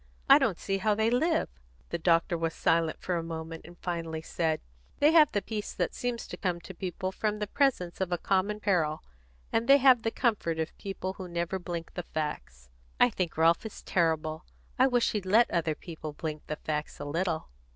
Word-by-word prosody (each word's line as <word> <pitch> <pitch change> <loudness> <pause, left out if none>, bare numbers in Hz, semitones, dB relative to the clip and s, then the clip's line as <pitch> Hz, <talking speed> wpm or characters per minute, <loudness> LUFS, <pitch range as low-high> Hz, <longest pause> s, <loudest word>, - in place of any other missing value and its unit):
I - - +9
don't - - +1
see 195 0 -2
how 210 +2 +2
they 220 +2 +2
live!" 315 +8 +2 0.4
The 170 - -2
doctor 165 +1 +3
was 165 -1 -2
silent 165 -1 +1
for 180 -2 -1
a - - -1
moment, 165 0 -6
and 175 +1 -13
finally 165 -3 -4
said: 160 -1 -1 0.4
"They 295 +2 +5
have 315 -3 +6
the 205 - -1
peace 215 -2 -4
that - - -1
seems 245 -1 -3
to - - -6
come 180 -3 -1
to 190 - -9
people 185 +1 -4
from 210 +2 -1
the 210 - -2
presence 205 -8 0
of 185 -1 -1
a 175 - +1
common 200 +4 0
peril, 165 -7 +1 0.5
and 230 +1 +1
they 275 +1 +8
have 260 -3 +6
the 225 - 0
comfort 210 -9 0
of 160 0 -3
people 195 -1 -4
who 190 -1 -8
never 170 +2 -2
blink 170 -2 -6
the - - -3
facts." 65 - -5 0.3
"I 245 - +6
think 180 -6 -3
Ralph 165 +1 +4
is 220 - -8
terrible. 160 -2 0 0.4
I 260 - +6
wish 245 -2 +2
he'd 205 -3 -3
let 225 +5 +5
other 165 -2 0
people 155 -3 -8
blink 155 0 -5
the 150 - -2
facts 150 -1 -4
a 145 - -5
little." 165 +2 -2
175 Hz, 205 wpm, -29 LUFS, 160-210 Hz, 0.5 s, I